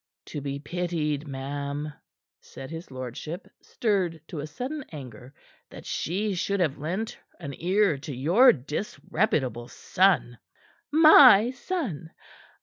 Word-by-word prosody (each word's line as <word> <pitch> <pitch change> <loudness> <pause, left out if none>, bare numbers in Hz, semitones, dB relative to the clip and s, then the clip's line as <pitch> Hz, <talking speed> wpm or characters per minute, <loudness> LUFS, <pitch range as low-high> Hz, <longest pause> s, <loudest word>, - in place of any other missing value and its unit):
"To 145 - -6
be 140 0 -4
pitied, 155 -1 -3
ma'am," 140 +2 -4 0.5
said 135 +2 -11
his 165 +2 -8
lordship, 130 - -7
stirred 190 -7 -1
to 150 -4 -5
sudden 265 - -5
anger, 130 -5 -10 0.4
"that - - -11
she 200 +5 -2
should 200 +2 -1
have 155 -6 0
lent 185 +9 -4 0.2
an 140 -5 -6
ear 185 -3 +2
to 145 -1 -7
your 180 - +6
disreputable 145 - -2
son." 185 -11 +1 0.5
"My 280 -8 +8
son? 255 - -4
160 Hz, 115 wpm, -26 LUFS, 140-200 Hz, 0.5 s, My